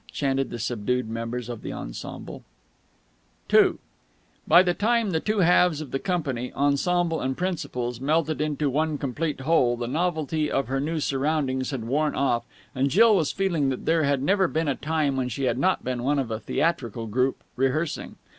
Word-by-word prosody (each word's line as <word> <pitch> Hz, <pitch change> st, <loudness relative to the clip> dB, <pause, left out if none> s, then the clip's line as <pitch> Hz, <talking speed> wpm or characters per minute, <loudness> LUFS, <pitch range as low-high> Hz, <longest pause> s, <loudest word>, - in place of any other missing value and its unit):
chanted 135 Hz, -1 st, 0 dB
the 120 Hz, -, -5 dB
subdued 120 Hz, +1 st, -1 dB
members 115 Hz, +1 st, -4 dB
of 120 Hz, -3 st, -6 dB
the -, -, -5 dB
ensemble. -, -, -7 dB, 1.1 s
II -, -, +6 dB, 0.7 s
By 175 Hz, +3 st, +7 dB
the 175 Hz, -1 st, +1 dB
time 225 Hz, +1 st, +1 dB
the 160 Hz, -, +1 dB
two 210 Hz, +3 st, 0 dB
halves 175 Hz, -2 st, +4 dB
of 155 Hz, -4 st, -7 dB
the 135 Hz, -, -1 dB
company, 140 Hz, -10 st, -2 dB
ensemble 160 Hz, +4 st, +1 dB
and 130 Hz, 0 st, -2 dB
principals, 125 Hz, -9 st, -3 dB
melted 155 Hz, +2 st, +1 dB
into 150 Hz, -1 st, 0 dB
one 150 Hz, +3 st, 0 dB
complete 140 Hz, +2 st, -3 dB
whole, 130 Hz, -5 st, +2 dB
the 120 Hz, -, -3 dB
novelty 155 Hz, +1 st, -1 dB
of 135 Hz, -3 st, -1 dB
her 135 Hz, +1 st, 0 dB
new 155 Hz, +3 st, -1 dB
surroundings 135 Hz, -2 st, 0 dB
had 130 Hz, -5 st, -4 dB
worn 145 Hz, +6 st, 0 dB
off, 135 Hz, -4 st, +1 dB, 0.3 s
and 135 Hz, +1 st, +1 dB
Jill 220 Hz, -, +6 dB
was 165 Hz, -6 st, +1 dB
feeling 170 Hz, -8 st, 0 dB
that 130 Hz, -, -4 dB
there 165 Hz, 0 st, +3 dB
had 140 Hz, -2 st, +1 dB
never 190 Hz, +3 st, +3 dB
been 160 Hz, -1 st, -1 dB
a 140 Hz, -, +2 dB
time 150 Hz, -1 st, -1 dB
when 125 Hz, -1 st, -1 dB
she 130 Hz, +4 st, -4 dB
had 125 Hz, -1 st, +1 dB
not 185 Hz, +5 st, +1 dB
been 125 Hz, -1 st, -2 dB
one 140 Hz, +4 st, +1 dB
of 130 Hz, -4 st, -1 dB
a 110 Hz, -, -2 dB
theatrical 120 Hz, -7 st, -1 dB
troupe, 125 Hz, +5 st, 0 dB
rehearsing. 135 Hz, +5 st, -1 dB
140 Hz, 185 wpm, -25 LUFS, 125-165 Hz, 1.1 s, By